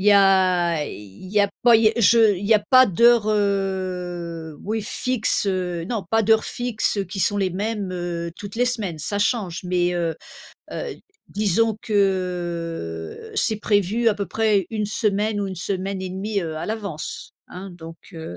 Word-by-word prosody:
Il 200 - -2
y 210 - +8
a, 185 -5 +4
il 100 - -10
y 210 +1 +2
a 200 -1 +2
pas, 240 -1 +6
il 220 0 +4
y - - +1
je 220 -2 +5
il 190 - -6
y 225 - +5
a 210 - +3
pas 255 -1 +8
d'heures 235 +3 +4
heu, 180 -5 -2
oui 220 +2 -2
fixes 235 -1 0
heu, 180 -3 -2
non 220 -2 -3
pas 225 +3 +2
d'heures 220 +1 +3
fixes 240 -4 -1
heu, 200 - 0
qui 190 +2 -8
sont 205 - +2
les 195 -2 0
mêmes 205 +1 -3
heu, 175 -1 -4
toutes 200 -1 -8
les 245 - +3
semaines, 215 -10 -2
ça 200 +7 -1
change. 205 -5 -1
Mais 180 0 +1
heu 170 -2 -1 0.6
heu, - - -4 0.4
disons 215 +2 +1
que, 175 - -2
c'est 220 - +1
prévu 210 +2 +1
à 215 - +2
peu 200 -2 -4
près, 210 -1 +1
1 215 -2 -2
semaine 210 0 0
ou 200 - -1
1 190 - -5
semaine 190 +1 -3
et 185 - -4
demie 200 +2 -2
heu, 160 -2 -4
à - - -5
l'avance, 205 -8 -5 0.2
hein. 190 +1 -8
Donc 165 -1 -10 0.2
heu, 160 - -8
195 Hz, 185 wpm, -22 LUFS, 175-215 Hz, 0.6 s, y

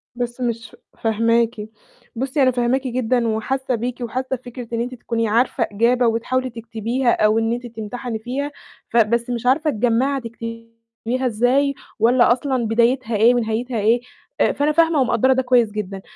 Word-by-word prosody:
بس 240 +1 -4
مش 230 -2 -2
ف - - -17 0.2
فاهماكِ. 230 0 +1 0.5
بُصي، 265 +4 -1
أنا 255 - +4
فاهماكِ 250 +2 0
جدًا 245 -1 0
وحاسة 255 +4 -1
بيكِ 245 +2 -4
وحاسة 255 +3 -2
بفكرة 245 -1 -9
إن 230 - 0
أنتِ 250 +1 -4
تكوني 230 -1 -2
عارفة 230 +2 +1
إجابة 235 +3 +2
وتحاولي 255 +3 0
تكتبيها 230 +2 -1
أو 215 +1 +3
إن 225 +1 0
أنتِ 245 +1 -5
تمتحني 230 +1 -6
فيها، 270 +6 -4 0.4
ف 235 - -1
بس 235 +2 +2
مش 240 0 -3
عارفة 290 +5 +3
تجمَّعي 250 +3 +1
هتكتبيها 230 +1 -6
إزاي، 255 +5 +2 0.3
والّا 240 +2 +4
أصلًا 255 -1 0
بدايتها 235 +1 +1
إيه 230 +4 +5
ونهايتها 235 +1 -1
إيه، 230 +4 +3 0.4
آآ، - - +4
فأنا 290 +2 +1
فاهمة 325 -2 +3
ومقدَّرة 255 +1 +3
ده 260 - +1
كويس 245 -4 +3
جدًا. 195 -2 -5
240 Hz, 165 wpm, -21 LUFS, 230-255 Hz, 0.5 s, إيه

